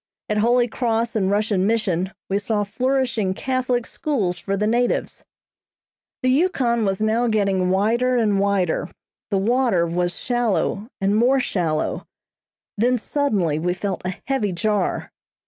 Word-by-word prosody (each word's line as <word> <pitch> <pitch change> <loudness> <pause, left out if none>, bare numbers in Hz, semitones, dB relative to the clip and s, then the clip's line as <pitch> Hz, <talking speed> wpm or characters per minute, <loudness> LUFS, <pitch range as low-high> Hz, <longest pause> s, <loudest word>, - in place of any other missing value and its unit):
At 210 0 +1
Holy 240 +2 +3
Cross 230 -1 -1
and 195 -3 +1
Russian 205 -2 +1
Mission 190 -5 0 0.2
we 195 +1 0
saw 205 0 0
flourishing 245 -3 0
Catholic 255 -1 -1
schools 200 - -2
for 195 +3 -2
the 210 - 0
natives. 240 +3 0 1.0
The 255 - +3
Yukon 255 - +2
was 195 +1 0
now 225 +3 +2
getting 195 -4 +1
wider 230 +7 +2
and 210 -4 +2
wider, 195 -4 0 0.4
the 200 - +1
water 230 -3 +2
was 175 +1 -1
shallow 220 -4 0
and 195 +1 +1
more 250 +5 +4
shallow, 165 -10 -1 0.7
then 245 +4 +2
suddenly 210 - 0
we 180 +2 -1
felt 195 0 -3
a 185 0 -3
heavy 260 -7 0
jar. 195 +2 -1
215 Hz, 140 wpm, -22 LUFS, 190-245 Hz, 1.0 s, more